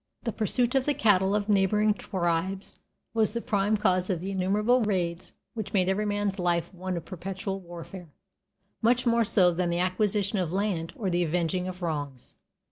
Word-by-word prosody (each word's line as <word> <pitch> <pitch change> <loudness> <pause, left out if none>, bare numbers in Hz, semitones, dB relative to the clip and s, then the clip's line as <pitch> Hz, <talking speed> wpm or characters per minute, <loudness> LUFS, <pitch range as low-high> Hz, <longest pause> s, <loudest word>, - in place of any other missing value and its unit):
The 230 - -1
pursuit 240 +3 0
of 265 -1 +2
the 290 - +1
cattle 200 -6 +3
of 210 0 -1
neighboring 210 +1 +3
tribes 190 0 -2 0.3
was 220 -2 +1
the 235 - -1
prime 215 -2 +1
cause 185 -3 +1
of 180 -4 0
the 190 +3 -4
innumerable 210 +6 +2
raids 180 -4 -1 0.2
which 220 -3 -5
made 185 -3 +2
every 205 +2 0
man's 205 -1 -1
life 175 0 0
one 185 0 -4
of 165 - -6
perpetual 190 +2 -5
warfare, 175 0 -10 0.7
much 245 +2 +3
more 235 -1 +3
so 185 -4 +4
than 175 +1 -1
the 170 - 0
acquisition 195 +3 +1
of 175 -3 -1
land 190 -4 -1
or 195 -5 -2
the 175 0 +2
avenging 175 +2 -1
of 180 0 -7
wrongs. 145 -6 -4
190 Hz, 180 wpm, -27 LUFS, 180-210 Hz, 0.7 s, so